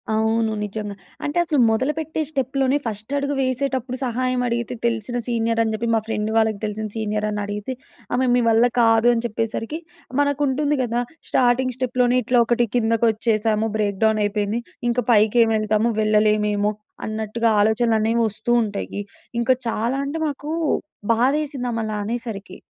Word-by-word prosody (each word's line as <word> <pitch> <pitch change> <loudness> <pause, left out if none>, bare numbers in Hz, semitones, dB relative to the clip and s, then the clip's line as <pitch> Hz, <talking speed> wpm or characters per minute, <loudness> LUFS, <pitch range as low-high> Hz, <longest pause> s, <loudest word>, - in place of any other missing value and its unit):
అవును. 220 0 +1
నిజంగా. 210 0 -5 0.3
అంటే 290 +3 -2
అసలు 305 -4 +1
మొదలుపెట్టే 300 +7 -1
స్టెప్‌లోనే 270 -1 0
ఫస్ట్ 215 +2 -5
అడుగు 280 0 -1
వేసేటప్పుడు 260 -1 -1
సహాయం 255 +1 0
అడిగితే 235 0 -2
తెలిసిన 235 +1 -1
సీనియర్ 230 -1 0
అని 220 - -1
చెప్పి. 225 +2 -2
మా - - +3
ఫ్రెండ్ 215 -1 -1
వాళ్ళకి 220 -2 +2
తెలిసిన 215 +1 -3
సీనియర్ 215 -1 -1
అని 210 0 -2
అడిగితే 205 +5 -4 0.4
ఆమె, 260 - +2
"మీ 245 - +3
వల్ల 225 +1 +5 0.2
కాదు" 225 0 +4
అని 230 0 -1
చెప్పేసరికి 225 +6 -3 0.4
మనకు 285 0 +1
ఉంటుంది 290 +2 +1
కదా! 240 0 0 0.3
స్టార్టింగ్ 255 +1 +2
స్టెప్‌లోనే 250 -1 +1
ఇట్లా 245 +2 +3
ఒకటి 240 +1 +2
కిందకి 230 -1 +2
వచ్చేసాము. 220 0 +1
బ్రేక్ 205 -2 -1
డౌన్ 220 -1 +3
అయిపోయింది. 205 +2 -1 0.3
ఇంకా 245 +1 +1
పైకి 215 +1 +4
ఏమి 225 0 +1
వెళ్తాము 215 +1 +1
వెళ్లేమేమో! 210 -1 +2 0.3
అన్నట్టుగా 220 +1 -1
ఆలోచనలు 220 +2 +3
అనేవి 225 +2 +1
వస్తూ 215 +3 -4
ఉంటాయి. 205 -1 -4 0.4
ఇంకా 235 +2 +4
చాలా 230 +3 -1
అంటే, 285 +3 -3
మాకు 290 0 -5 0.6
బాధ 245 +4 +3
వేసింది 275 -4 -4
ఆమె 230 -1 -2
అలా 215 -1 -3
అనేసరికి... 220 -4 -5
230 Hz, 155 wpm, -22 LUFS, 215-255 Hz, 0.6 s, వల్ల